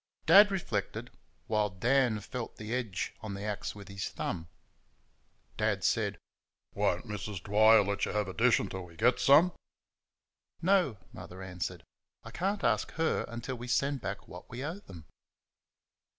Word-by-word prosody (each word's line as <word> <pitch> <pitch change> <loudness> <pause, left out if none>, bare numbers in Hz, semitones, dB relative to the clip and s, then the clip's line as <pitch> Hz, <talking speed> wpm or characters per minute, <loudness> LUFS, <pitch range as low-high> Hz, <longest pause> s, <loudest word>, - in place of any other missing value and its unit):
Dad 205 +1 +8
reflected, 145 - -3 0.3
while 105 -1 +1
Dan 115 +3 +2
felt 120 +3 -6
the 110 +2 -5
edge 110 -9 -2
on 105 -3 -5
the 100 - -6
axe 105 -1 -3
with 100 -2 -11
his 100 0 -4
thumb. 85 -2 -4 1.1
Dad - - 0
said, - - +1 0.6
"Won't - - 0
Missus 105 -1 -5
Dwyer 110 +4 +5
let 100 +1 -1
you - - -3
have 105 -1 0
a 95 - -5
dishful 115 +1 +3
until 95 -1 -6
we 85 -1 -15
get 120 +7 +3
some?" 155 +6 +6 1.1
"No," 180 - +2 0.2
Mother 95 +1 -9
answered; 90 -1 -5 0.4
"I - - -10
can't 195 +3 -2
ask - - +2
her 165 0 0
until 120 +2 -5
we 120 +1 -7
send 135 +2 +1
back - - -5
what - - -11
we 125 +4 -5
owe 165 +6 -4
them." 85 - -12
110 Hz, 155 wpm, -31 LUFS, 100-135 Hz, 1.1 s, Dad